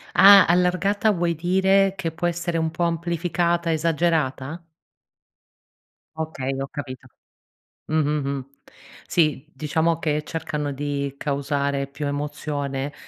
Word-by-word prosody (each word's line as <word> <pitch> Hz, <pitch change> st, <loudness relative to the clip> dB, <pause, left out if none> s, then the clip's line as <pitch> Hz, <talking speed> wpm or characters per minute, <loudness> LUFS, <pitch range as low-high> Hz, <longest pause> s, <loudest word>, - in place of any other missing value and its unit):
Ah, 200 Hz, 0 st, +9 dB
allargata 185 Hz, +5 st, +2 dB
vuoi 170 Hz, -3 st, 0 dB
dire 190 Hz, +3 st, +3 dB
che 165 Hz, -4 st, -2 dB
può 175 Hz, +2 st, -2 dB
essere 170 Hz, 0 st, -2 dB
un 160 Hz, 0 st, 0 dB
po' 175 Hz, -, -2 dB
amplificata, 170 Hz, 0 st, 0 dB
esagerata? 160 Hz, -2 st, 0 dB, 1.5 s
Okay, 155 Hz, -4 st, -3 dB
ho 135 Hz, -, -3 dB
capito. 130 Hz, -2 st, -8 dB, 0.8 s
Mh, 155 Hz, -, -3 dB
mh, 150 Hz, -2 st, 0 dB
mh. 135 Hz, -2 st, -3 dB, 0.6 s
Sì, 155 Hz, -5 st, +1 dB
diciamo 160 Hz, +4 st, 0 dB
che 150 Hz, -1 st, -1 dB
cercano 150 Hz, -3 st, -3 dB
di 140 Hz, 0 st, -3 dB
causare 140 Hz, -1 st, -1 dB
più 145 Hz, +1 st, -6 dB
emozione 145 Hz, -1 st, -3 dB
160 Hz, 115 wpm, -23 LUFS, 140-170 Hz, 1.5 s, Ah